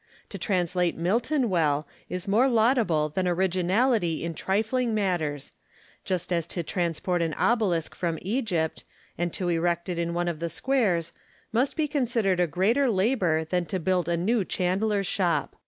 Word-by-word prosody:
To - - -7
translate 180 -3 0
Milton 235 - +1
well 155 -6 +1 0.2
is 180 +1 -4
more 220 +7 +4
laudable 220 - +2
than 185 +4 -1
originality 185 +1 +1
in 170 - -3
trifling 220 - 0
matters; 165 -9 -1 0.5
just 180 -1 -1
as 170 -1 -1
to 175 - -3
transport 175 +1 -1
an 165 -2 -1
obelisk 200 -9 +1
from 170 -2 -2
Egypt, 190 -7 -1 0.3
and 175 0 -2
to 180 -2 -2
erect 170 +1 0
it 175 -1 -2
in 170 0 -2
one 175 0 0
of 170 -3 -2
the 170 0 -2
squares, 190 -5 0 0.4
must 250 +5 +1
be 310 -2 0
considered 235 -10 0
a 175 - +3
greater 220 - +2
labour 190 -6 +1
than 175 +1 -1
to 190 - -2
build 180 0 0
a 170 - +1
new 210 +5 +1
chandler's 195 +3 0
shop. 175 -3 0
180 Hz, 160 wpm, -26 LUFS, 170-220 Hz, 0.5 s, more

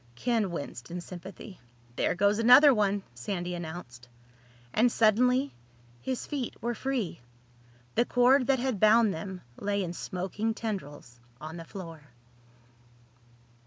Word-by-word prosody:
Ken 225 - 0
winced 140 -7 -6
in 180 - -5
sympathy. 185 +3 -10 0.4
"There - - +1
goes 200 +3 +2
another 250 +5 +8
one!" 205 -3 +1
Sandy 175 +8 -4
announced. 160 -8 -8 0.6
And 235 +2 +4
suddenly 250 +6 +3 0.5
his 260 -2 -3
feet 275 -5 -4
were 240 +1 -2
free. 255 -6 -3 0.7
The 235 - +2
cord 250 +2 +4
that 270 -1 +3
had 250 -4 -1
bound 215 0 +5
them 185 +3 -6 0.2
lay 200 -1 -1
in 175 -1 -4
smoking 190 +6 -3
tendrils 145 - -6 0.2
on 155 +3 -7
the 165 - -8
floor. 165 -4 -9
200 Hz, 125 wpm, -29 LUFS, 175-240 Hz, 0.7 s, another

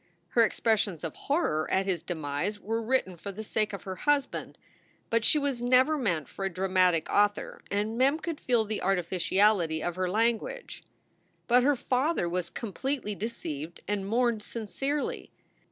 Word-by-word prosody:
Her 235 - +3
expres 225 -1 +2
sions 185 -7 -2
of 165 - -4
horror 275 - 0
a,t 190 +1 +2
his 180 -4 0
demise 165 +4 -3
were 225 +3 -2
written 230 -5 0
for 200 +4 -6
the 215 +3 -7
sake 215 0 -1
of 200 - -7
her 190 -1 -5
husband, 290 +1 0 0.5
but 230 -1 +3
she 305 - +5
was 280 -4 -1
never 255 +5 +4
meant 180 - -1
for 195 - -7
a 195 - +1
dramatic 185 -2 +2
author 205 0 +1
and 210 +3 -1
Mem 275 +4 +4
could 325 -1 -5
feel 240 -3 +2
the 215 0 -3
artificiality 180 -2 +2
of 175 0 -2
her 185 -1 0
language. 230 - -1 0.7
But 245 +1 +5
her 285 +3 +3
father 260 - 0
was 175 0 -2
completely 240 +2 -3
deceived 170 -7 -5
and 205 -1 -1
mourned 235 -1 +2
sincerely. 270 +7 -3
210 Hz, 165 wpm, -29 LUFS, 185-245 Hz, 0.7 s, she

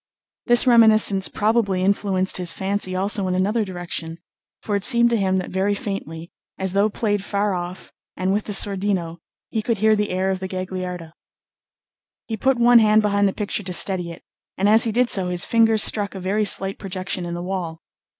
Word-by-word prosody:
This 240 0 +5
reminiscence 220 -5 +5
probably 210 -4 0
influenced 190 -1 0
his 180 -2 0
fancy 190 -1 -3
also 195 +1 0
in 180 - -1
another 205 +5 0
direction; 175 -3 -5 0.5
for 205 - -2
it 200 - -2
seemed 235 0 +4
to - - +2
him 190 -3 0
that 185 - -4
very 195 +2 0
faintly, 170 -5 -6 0.3
as 190 -1 -3
though 200 +2 +2
played 205 -2 -2
far 200 0 -1
off, 180 0 -7 0.3
and 185 +1 -1
with 210 +1 -2
the - - -6
sordino, 195 -4 +1 0.3
he 220 - -1
could 225 +1 -2
hear 215 +2 +3
the 210 0 -2
air 190 +1 -1
of 190 - -3
the 190 - -5
Gagliarda. 185 -3 -6 1.1
He 225 - -4
put 265 +4 0
one 240 0 +6
hand 215 0 +3
behind 205 -1 +1
the - - 0
picture 210 +1 -4
to 185 -2 -6
steady 180 -1 0
it, 170 - -13 0.3
and 195 - +1
as 220 +2 +4
he 225 - -1
did 245 +2 +1
so 185 -2 +1
his 180 -1 0
finger 225 -1 +3
struck 205 -1 +1
a - - -6
very 200 +4 -1
slight 195 0 +1
projection 185 -1 -4
in 170 0 -5
the 175 - -6
wall. 175 -3 -5
195 Hz, 200 wpm, -21 LUFS, 185-215 Hz, 1.1 s, one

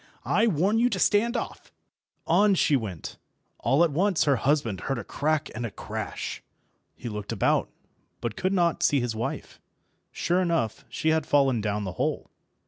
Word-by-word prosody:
"I 225 - +3
warn 200 +4 +2
you 245 +1 +4
to - - -2
stand 230 +3 +2
off." - - -6 0.5
On 205 -1 +4
she 155 -4 +3
went; 100 - -5 0.4
all 145 +5 +3
at 170 - +2
once 185 +4 +2
her 140 -3 +3
husband 130 -8 0
heard 135 - -2
a 115 - -4
crack 155 +7 -1
and 120 - -5
a 115 - -2
crash. - - -5 0.5
He 120 - -8
looked 105 -2 -5
about, 115 - +1 0.5
but 115 -2 -4
could 185 - -1
not 175 -4 +1
see 145 - +3
his 120 -3 -2
wife. 115 - -5 0.5
Sure 175 +2 0
enough, 165 - -1
she 160 - -1
had 160 -1 +1
fallen 135 -5 +3
down 105 0 -1
the 95 - -3
hole. - - -2
145 Hz, 175 wpm, -26 LUFS, 115-180 Hz, 0.5 s, you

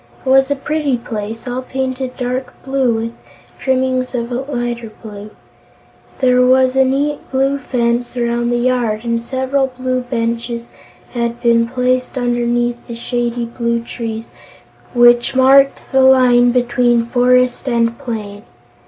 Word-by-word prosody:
It - - -1
was 270 +1 +5
a 285 - +1
pretty 290 -1 -1
place, 225 0 -6
all 250 +1 -3
painted 260 0 -4
dark 250 +1 -3
blue 265 -2 +1
with 225 +1 -2 0.5
trimmings 260 -1 0
of 235 0 -3 0.2
lighter 240 -3 -3
blue. 210 -1 -9 0.9
There 250 -1 +4
was 255 0 +4
a 265 - +5
neat 280 +3 0
blue 270 +1 0
fence 240 -1 -1
around 235 0 0
the 240 - +1
yard 240 -3 0
and 235 -1 -1
several 265 +2 0
blue 255 0 -2
benches 235 -1 -3 0.4
had 235 -1 -2
been 235 -1 +3
placed 255 +1 -1
underneath 240 -1 0
the 235 - -6
shady 240 0 -2
blue 235 0 -2
trees 225 -1 -5 0.7
which 240 +1 +4
marked 270 +1 +4
the 265 - +4
line 250 -2 +5
between 240 -1 +2
forest 250 +2 +2
and 230 -1 +1
plain. 210 -4 -6
245 Hz, 135 wpm, -17 LUFS, 235-260 Hz, 0.9 s, was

